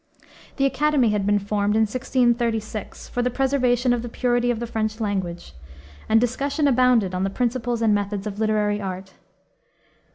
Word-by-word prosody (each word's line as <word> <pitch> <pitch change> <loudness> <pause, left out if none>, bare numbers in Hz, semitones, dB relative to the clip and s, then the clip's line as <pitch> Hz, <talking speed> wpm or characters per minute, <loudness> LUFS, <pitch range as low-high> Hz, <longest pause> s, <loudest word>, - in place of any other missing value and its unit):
The 275 - +1
Academy 285 -3 +2
had 205 -1 -1
been 205 0 +3
formed 205 +1 -1
in 220 - +4
1636, 235 -2 -1
for 245 - -2
the 250 - +1
preservation 255 -2 +1
of 240 - -1
the 240 - -6
purity 245 0 0
of 240 -2 0
the 235 - -3
French 220 -1 -3
language, 190 - -3 0.6
and 225 - +5
discussion 275 +5 0
abounded 250 -7 +3
on 185 +1 -1
the 195 - 0
principles 240 +1 -1
and 220 -2 +4
methods 205 0 -2
of 205 -1 -5
literary 210 -1 +1
art. 190 0 -6
225 Hz, 165 wpm, -23 LUFS, 205-245 Hz, 0.6 s, and